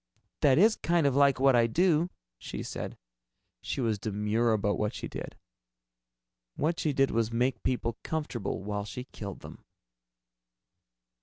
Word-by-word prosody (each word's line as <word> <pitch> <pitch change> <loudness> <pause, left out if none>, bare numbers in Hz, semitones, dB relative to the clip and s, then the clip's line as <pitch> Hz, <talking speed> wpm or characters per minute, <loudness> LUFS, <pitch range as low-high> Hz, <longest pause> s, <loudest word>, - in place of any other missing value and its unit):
"That 135 -3 +4
is 215 +6 +5
kind 170 -2 +1
of 140 -2 +2
like 140 -2 +4
what 135 -1 +5
I 115 -1 +4
do," 170 +5 +2 0.3
she - - -6
said. - - -6 0.6
She - - -4
was 110 -4 0
demure 105 +3 0
about 105 -2 +1
what 105 -1 -1
she - - -5
did. - - -7 1.2
What 165 +3 0
she 155 - +1
did 135 -1 +2
was 115 0 0
make 125 0 0
people 120 -2 -1
comfortable 120 -12 -3
while 105 0 -3
she 105 +4 -6
killed 100 -7 -8
them. - - -11
125 Hz, 150 wpm, -29 LUFS, 110-145 Hz, 1.2 s, is